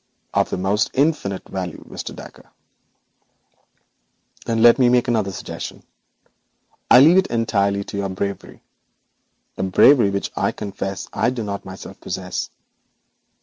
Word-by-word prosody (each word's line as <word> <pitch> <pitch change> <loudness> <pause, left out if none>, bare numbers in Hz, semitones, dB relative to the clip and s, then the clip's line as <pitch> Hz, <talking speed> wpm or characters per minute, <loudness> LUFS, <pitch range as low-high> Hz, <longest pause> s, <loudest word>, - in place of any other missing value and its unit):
'Of - - +2
the - - -2
most 95 +3 0
infinite 135 -9 0
value, 90 -3 -6
Mr. - - -7
Dacre.' - - -13 2.0
'Then 115 -1 +1
let 120 +2 +7
me 125 -2 +5
make 125 -1 +3
another 110 -5 0
suggestion. 95 - -7 1.1
I 125 - +9
leave 165 +6 +7
it 190 - +3
entirely 100 -4 0
to 100 - -7
your 100 -1 -2
bravery; 100 +1 -5 0.9
a - - -3
bravery 100 +4 +5
which, 100 0 -3
I - - 0
confess, 100 -1 -5
I 115 - +1
do 125 -3 -4
not 100 -1 -5
myself 95 0 -10
possess. - - -4
100 Hz, 135 wpm, -21 LUFS, 100-120 Hz, 2.0 s, I